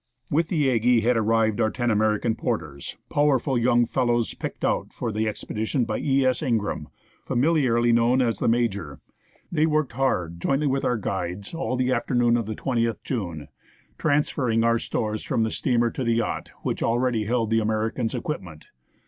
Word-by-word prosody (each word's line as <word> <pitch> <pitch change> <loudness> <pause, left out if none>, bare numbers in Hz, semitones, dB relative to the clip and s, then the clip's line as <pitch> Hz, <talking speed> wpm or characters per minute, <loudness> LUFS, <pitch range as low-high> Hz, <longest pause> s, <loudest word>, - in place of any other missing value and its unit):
With 160 +3 +2
the 150 -6 +1
Aggie 120 0 +3
had 120 +2 +2
arrived 115 0 +2
our 110 - +3
ten 120 +1 -1
American 110 +1 +1
porters, 85 - -4
powerful 145 -2 +2
young 120 0 +3
fellows, 120 -2 0
picked - - -5
out - - -1
for 115 - -4
the 110 +1 -1
expedition 110 +3 -2
by - - -2
E. 135 -2 +2
S. 130 -1 +1
Ingraham, 110 - -1 0.4
familiarly 125 -4 +2
known 120 +2 +3
as 115 -5 +1
"The - - 0
Major." 110 - 0 0.5
They 160 -2 +2
worked 155 -3 0
hard, 90 -11 -1
jointly 140 +7 +1
with 135 -1 0
our 125 - +1
guides, 95 - -4
all 165 -6 -2
the 130 0 0
afternoon 120 -2 +2
of 115 -3 -1
the 110 - -3
20th 115 -3 -1
June, 85 - -4 0.5
trans 145 +1 +2
ferring 115 -4 +1
our 115 0 +3
stores 110 -1 -2
from 115 - 0
the 110 - -1
steamer 120 -2 +1
to 130 - -4
the 115 -1 +1
yacht, 115 - -2
which - - -2
already 120 -2 +1
held 115 -1 0
the 115 - +4
Americans' 110 +2 -1
equipment. 90 - -6
115 Hz, 175 wpm, -25 LUFS, 110-130 Hz, 0.5 s, the